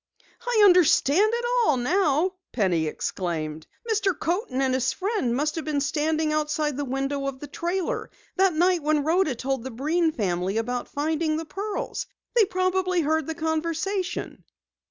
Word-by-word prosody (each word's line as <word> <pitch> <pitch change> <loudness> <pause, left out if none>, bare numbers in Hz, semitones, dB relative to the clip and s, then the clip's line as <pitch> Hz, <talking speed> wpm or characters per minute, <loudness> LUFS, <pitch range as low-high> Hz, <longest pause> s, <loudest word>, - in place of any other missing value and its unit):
"I 465 -3 +3
understand 360 +1 +5
it 475 +1 -1 0.2
all 300 - +3
now!" 320 +5 +2 0.2
Penny 175 -8 +1
exclaimed. 160 -2 -3 0.2
"Mr. 405 -6 +1
Coaten 335 - -1
and 265 -1 +2
his 260 0 +1
friend 370 - -1
must 300 +3 0
have 320 - -3
been 300 -2 0
standing 310 +2 0
outside 300 -1 0
the 290 +1 -2
window 275 +1 -2
of 275 -1 -4
the 295 - -7
trailer 345 +5 -3 0.3
that 380 -1 +3
night 355 +1 +3
when 300 0 +1
Rhoda 320 -2 +2
told 265 0 -2
the 260 - -5
Breen 315 +7 +1
family 190 - -1
about 245 +2 -2
finding 310 +1 -1
the 325 - -4
pearls! 405 +5 -4 0.3
They 455 -3 +6
probably 370 -1 0
heard 315 0 0
the 320 - -3
conversation." 335 +4 -2
310 Hz, 155 wpm, -25 LUFS, 270-365 Hz, 0.3 s, They